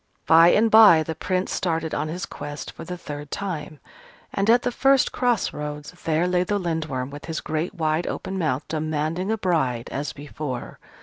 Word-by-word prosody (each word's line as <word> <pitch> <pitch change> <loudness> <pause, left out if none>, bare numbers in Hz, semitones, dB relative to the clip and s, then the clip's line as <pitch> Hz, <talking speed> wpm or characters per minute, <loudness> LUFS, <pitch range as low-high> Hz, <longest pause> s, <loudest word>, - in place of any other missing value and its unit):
By 165 +1 +7
and 220 +5 +4
by 210 -8 +8
the 160 - -4
Prince 185 +3 -2
started 165 -3 -1
on - - -1
his 175 +3 -4
quest 145 0 -7
for - - -10
the 180 +2 -6
third 145 -3 -7
time: 160 -6 -5 0.5
and 200 +2 0
at 240 +1 +5
the 245 - 0
first 270 +2 +3
cross 245 -4 0
roads 150 0 -6
there 165 +2 +2
lay 180 0 +2
the 205 +3 -1
Lindworm 155 -8 -3
with 145 +1 -9
his 165 -1 -3
great 160 +5 -3
wide 160 0 0
open 190 0 -4
mouth, 145 -4 -1
demanding 155 +4 -2
a 225 - 0
bride 135 - 0
as 145 +2 -3
before. 145 -3 -6
160 Hz, 185 wpm, -24 LUFS, 150-185 Hz, 0.5 s, by